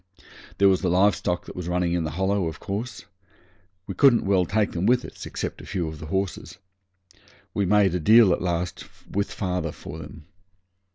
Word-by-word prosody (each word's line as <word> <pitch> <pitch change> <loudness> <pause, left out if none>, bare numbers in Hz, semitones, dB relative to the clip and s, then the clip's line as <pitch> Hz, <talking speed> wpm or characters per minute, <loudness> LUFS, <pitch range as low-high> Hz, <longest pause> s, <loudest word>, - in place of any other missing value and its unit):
There 100 - +5
was 95 -1 +3
the 90 - 0
live 95 +2 +4
stock 90 +1 -2
that - - -10
was 90 -2 -5
running 90 -1 0
in 85 -2 0
the - - -2
Hollow, 95 -1 +1
of 80 - -6
course. 110 +6 -5 0.8
We - - -5
couldn't 135 -5 +4
well 95 -2 +3
take 105 +2 +1
them 90 +4 -1
with 125 +1 +3
us, - - -9
except - - -5
a - - -11
few 90 -4 -2
of 80 -1 -7
the 80 - -8
horses. 95 +1 -3 1.0
We 100 -2 0
made 100 -2 +4
a 90 - 0
deal 110 +2 +6
at - - -2
last 90 0 -2 0.2
with 100 +1 -2
father 90 -4 -2
for 75 +2 -9
them. 80 -1 -11
90 Hz, 195 wpm, -24 LUFS, 85-100 Hz, 1.0 s, deal